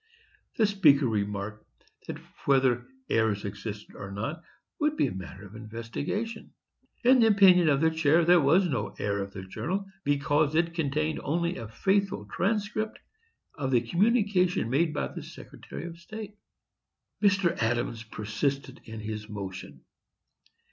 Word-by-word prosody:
The 220 - +4
Speaker 155 -9 +5
remarked 105 -1 -2 0.4
that - - -4 0.3
whether 130 -3 +3 0.2
errors 110 -3 +1
existed 105 +1 -7
or 100 - -7
not 130 - -4 0.4
would 300 0 +1
be - - +2
matter 95 +1 -8
of 100 - -13
investigation. 120 - -5 0.5
In 255 +2 +6
the 225 - +6
opinion 185 -5 +6
of 140 -1 +3
the 160 0 +4
chair, 160 +1 +3
there 175 0 +6
was 170 +7 +4
no 120 -9 -2
error 100 0 -1
of 100 0 -5
the 95 - -7
journal, 185 - -3 0.2
because 145 +1 +2
it 165 0 +2
contained 155 -1 -1
only 170 +4 0
a 115 - -6
faithful 190 - 0
transcript 215 - -1 0.6
of 135 -3 -3
the 125 -3 +3
communication 185 - +2
made 155 +4 +2
by 150 - -2
the - - -7
Secretary - - -9
of 170 -1 -8
State. 210 +3 -8 0.9
Mr. 195 -4 +3
Adams 115 0 0
persisted 130 +5 -3
in 110 -1 -7
his 105 0 -5
motion. 95 -9 -7
145 Hz, 140 wpm, -28 LUFS, 110-180 Hz, 0.9 s, In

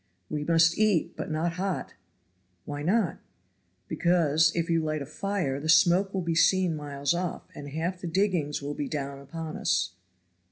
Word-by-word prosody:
"We 150 -1 -2
must 165 +2 +3
eat, 210 -7 +2
but - - -5
not 165 +2 -1
hot." 195 -2 -2 0.7
"Why 145 0 -5
not?" 185 +1 +1 0.7
"Because, 160 -3 +3
if 165 -1 0
you 165 -1 +2
light 155 -2 -2
a - - -8
fire, 155 -3 -2
the 155 +2 -4
smoke 180 +4 +5
will 190 -2 -2
be 170 -1 0
seen 180 0 +3
miles 145 0 -2
off, 175 0 -3
and 145 - -8
half 170 +5 -3
the 175 - -4
diggings 165 -6 0
will 145 +1 -3
be 145 -1 -3
down 140 -2 -4
upon 155 +3 -6
us. - - +1
165 Hz, 170 wpm, -27 LUFS, 150-180 Hz, 0.7 s, smoke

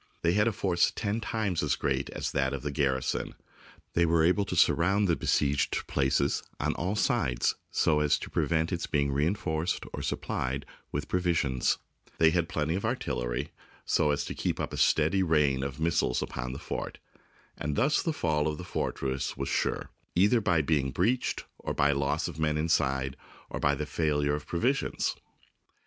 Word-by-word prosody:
They 85 - +4
had 105 +3 +3
a - - +3
force 90 -4 +2
ten 105 +1 -1
times 105 -7 -1
as 75 - +1
great 70 0 -1
as - - -3
that 70 -1 0
of 70 - -4
the 75 - -2
gar 70 -3 +1
rison; 65 - -3 0.6
they 85 - +3
were 85 -1 +3
able 90 +4 +3
to - - -3
surround 100 +4 +3
the 85 - +3
besieged 70 -2 +1
places 65 -2 +1 0.2
on - - 0
all 95 +5 -2
sides 60 - +1 0.2
so 75 -2 +2
as 75 -1 +3
to - - -8
prevent 80 +1 +1
its 85 -2 -2
being 70 -1 +1
rein 75 +8 +1
forced 85 -3 -2
or - - -4
supplied 65 +2 -2 0.3
with - - -3
provisions; 80 -8 +1 0.4
they 80 0 +5
had 85 -1 0
plenty 75 +1 -1
of 95 - -2
artillery, - - -2 0.3
so 75 - +2
as 70 0 0
to - - -4
keep - - -2
up - - -3
a - - -4
steady 80 +5 +3
rain 75 -6 +2
of 70 +1 -4
mis 85 +1 +2
siles 60 - 0
upon 65 0 -4
the 65 - -5
fort; - - -5 0.6
and 75 -1 -3
thus 140 +6 +3
the 165 - 0
fall 80 - 0
of 75 -1 -2
the 90 - -7
fortress 65 -7 -2
was 70 0 -3
sure, - - -1 0.2
either 105 +6 +4
by 85 -6 +2
being 70 -2 +1
breached, 115 - 0 0.3
by 70 - +3
the 70 - -1
loss 70 0 0
of - - -7
men 75 -1 +1
inside, 70 -4 +1 0.4
or - - -3
by 70 0 +2
the 75 - -3
failure 75 -2 0
of 75 0 -4
provisions. 125 +11 0
75 Hz, 190 wpm, -29 LUFS, 70-90 Hz, 0.6 s, they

